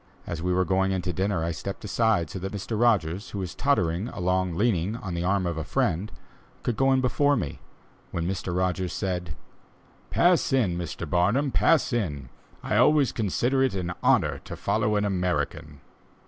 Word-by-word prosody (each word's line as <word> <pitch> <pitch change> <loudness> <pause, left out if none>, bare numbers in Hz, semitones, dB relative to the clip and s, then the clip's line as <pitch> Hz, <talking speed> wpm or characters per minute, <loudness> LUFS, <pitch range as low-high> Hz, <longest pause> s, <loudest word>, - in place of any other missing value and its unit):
As 85 -1 -4
we 90 +1 0
were 90 +1 +2
going 95 +2 +1
in 95 -2 -1
to 90 - -2
dinner, 95 -1 0
I 85 - -1
stepped 100 +4 -6
aside, 105 -7 +1
so 95 - -5
that 95 +2 -4
Mr. 105 +3 -3
Rogers 100 -5 +2
who - - -6
was 95 -2 -4
tottering 95 -8 +1
along 90 -4 -1
leaning 105 -2 +1
on 95 -6 -6
the 85 0 -2
arm 95 +1 +1
of 85 -2 -2
a - - -3
friend, 90 +7 -1 0.5
could 120 - -1
go 135 +4 +3
in 130 0 +3
before 145 +3 +2
me, 75 - -3 0.5
when 85 0 -3
Mr. 95 -1 -3
Rogers 90 0 -1
said: 90 -5 -3 0.7
"Pass 175 -3 +3
in, 115 -10 +2
Mr. 85 0 -5
Barnum, 100 - +2
pass 160 -2 +3
in; 75 - -2 0.3
I 105 - 0
always 140 +3 +4
consider 120 +5 0
it 130 -6 +2
an 90 -2 -2
honor - - +3
to - - -6
follow 105 -1 0
an 105 0 +1
American." 90 -6 -2
95 Hz, 185 wpm, -26 LUFS, 90-115 Hz, 0.7 s, always